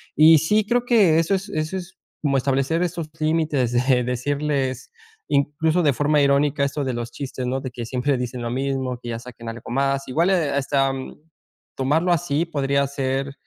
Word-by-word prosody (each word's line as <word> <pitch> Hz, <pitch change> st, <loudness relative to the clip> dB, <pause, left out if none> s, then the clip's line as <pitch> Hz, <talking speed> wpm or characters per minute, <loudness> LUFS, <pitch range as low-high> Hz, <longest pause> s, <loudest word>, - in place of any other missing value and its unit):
Y 160 Hz, +1 st, +7 dB
sí, 210 Hz, +8 st, +2 dB
creo 245 Hz, +1 st, +1 dB
que 205 Hz, -10 st, +4 dB
eso 165 Hz, +4 st, +1 dB
es 195 Hz, +2 st, -4 dB
eso 155 Hz, +1 st, -2 dB
es 185 Hz, 0 st, -9 dB, 0.2 s
como 140 Hz, -3 st, +1 dB
establecer 135 Hz, +6 st, +1 dB
esos 170 Hz, -3 st, -3 dB
límites, 155 Hz, -6 st, +1 dB
de 125 Hz, 0 st, +2 dB
decirles 135 Hz, +1 st, -2 dB, 0.4 s
incluso, 150 Hz, +4 st, +1 dB
de 145 Hz, -, +3 dB
forma 145 Hz, +2 st, +2 dB
irónica, 140 Hz, +1 st, +2 dB
esto 140 Hz, +1 st, -1 dB
de 130 Hz, -, -2 dB
los 120 Hz, 0 st, -5 dB
chistes, 130 Hz, -2 st, -5 dB
¿no? 130 Hz, +1 st, -1 dB
De 130 Hz, -, -6 dB
que 120 Hz, -2 st, -6 dB
siempre 130 Hz, +2 st, 0 dB
dicen 125 Hz, 0 st, -4 dB
lo 120 Hz, -, -3 dB
mismo, 130 Hz, -1 st, -2 dB
que 120 Hz, -, -7 dB
ya 115 Hz, -, -3 dB
saquen 115 Hz, -1 st, -9 dB
algo 115 Hz, +1 st, -8 dB
más, 135 Hz, +1 st, 0 dB
igual, 165 Hz, +8 st, +1 dB
eh, 170 Hz, -6 st, +1 dB
hasta, 135 Hz, -1 st, +1 dB
mm, 130 Hz, -1 st, -7 dB, 0.6 s
tomarlo 155 Hz, +7 st, +1 dB
así 165 Hz, -1 st, 0 dB
podría 140 Hz, -3 st, 0 dB
ser, 135 Hz, 0 st, -2 dB
140 Hz, 185 wpm, -22 LUFS, 130-155 Hz, 0.6 s, Y